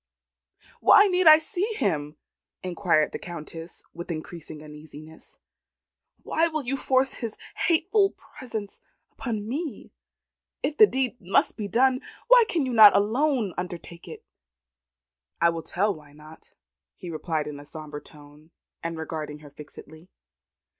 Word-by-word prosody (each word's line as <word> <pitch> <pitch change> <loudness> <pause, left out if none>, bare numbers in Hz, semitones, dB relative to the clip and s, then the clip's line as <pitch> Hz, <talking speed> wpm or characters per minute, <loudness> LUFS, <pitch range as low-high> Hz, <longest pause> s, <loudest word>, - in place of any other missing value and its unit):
"Why 405 - +7
need 365 -3 +2
I 310 0 +11
see 405 +6 -3
him?" 150 - -2 0.5
inquired 175 -4 +1
the - - -6
Countess 165 0 -9
with 170 +2 -8
increasing 155 -1 -7
uneasiness. 155 +1 -13 0.9
"Why 330 +1 +1
will 310 -3 -3
you 265 +2 -2
force 265 0 +1
his 230 -3 -6 0.2
hateful 390 +5 +2 0.3
presence 225 -7 -6 0.3
upon 220 -4 -4
me? 280 - -5 0.7
If 290 +2 -1
the 430 - +9
deed 260 -5 -2
must 190 +1 +1
be 210 -3 -4
done, 255 +5 +2 0.3
why - - +8
can 320 -6 0
you 255 - -3
not 215 -3 +9
alone 235 - +1
undertake 175 -1 -8
it?" - - -10 1.1
"I 170 - +4
will 165 0 -5
tell 200 +6 0
why 150 -3 -14
I - - -19
cannot," 155 +1 -15 0.4
he 175 - -8
replied 155 -1 -2
in 150 -1 -7
a - - -11
sombre 150 0 -9
tone, 150 +1 -17 0.3
and 165 0 -4
regarding 155 -2 -5
her 145 - -13
fixedly. 155 +3 -13
185 Hz, 140 wpm, -25 LUFS, -, 1.1 s, I